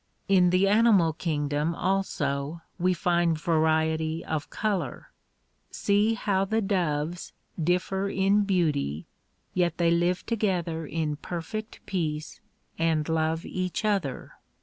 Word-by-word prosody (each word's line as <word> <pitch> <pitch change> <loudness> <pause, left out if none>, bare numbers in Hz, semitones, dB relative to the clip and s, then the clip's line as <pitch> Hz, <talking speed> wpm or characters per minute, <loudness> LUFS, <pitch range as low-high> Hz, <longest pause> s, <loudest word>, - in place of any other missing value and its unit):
In 185 -2 +5
the 185 +2 +3
animal 205 -6 +4
kingdom 150 0 -1
also 165 -5 -1 0.2
we 180 +1 +3
find 175 -2 +1
variety 160 0 +1
of 155 -2 -3
color. 195 - -3 0.6
See 210 +2 +2
how 195 -2 +1
the 220 +3 0
doves 175 -5 -1 0.3
differ 185 +3 0
in 195 +2 +3
beauty 150 - 0 0.5
yet 175 -3 +1
they 170 -1 +3
live 175 +1 +1
together 175 -8 -1
in 155 -2 -2
perfect 180 +8 -6
peace, 155 -5 -3 0.4
and 160 -2 +1
love 160 0 0
each 185 +3 -3
other. 195 -11 -1
170 Hz, 115 wpm, -27 LUFS, 160-195 Hz, 0.6 s, In